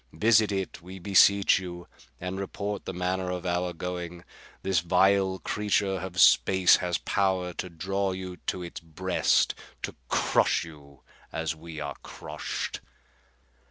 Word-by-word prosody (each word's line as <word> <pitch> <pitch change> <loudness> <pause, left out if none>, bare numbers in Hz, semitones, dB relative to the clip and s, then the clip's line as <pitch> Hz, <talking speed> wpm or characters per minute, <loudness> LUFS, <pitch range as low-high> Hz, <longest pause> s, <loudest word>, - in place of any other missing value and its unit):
Visit 110 +4 +4
it, 95 -2 -3
we 90 +2 -10
beseech 100 +1 +5
you, 90 -2 -8 0.3
and 90 +2 -4
report 100 +1 -4
the - - -3
manner 90 +1 -1
of 90 0 -4
our 90 0 0
going. 90 0 -5 0.4
This 95 -3 +2
vile 95 +2 +3
creature 100 +1 0
of 90 -1 -5
space 95 +1 +6
has 90 -2 -1
power 90 +2 0
to 90 - -5
draw 95 +3 -2
you 95 -1 -6
to 90 - -2
its 85 - -7
breast, 90 +3 +1 0.3
to - - -4
crush - - +2
you 70 -4 -15 0.3
as 80 0 -2
we 80 0 -9
are 70 -1 -4
crushed." - - -5
90 Hz, 140 wpm, -27 LUFS, 85-95 Hz, 0.4 s, space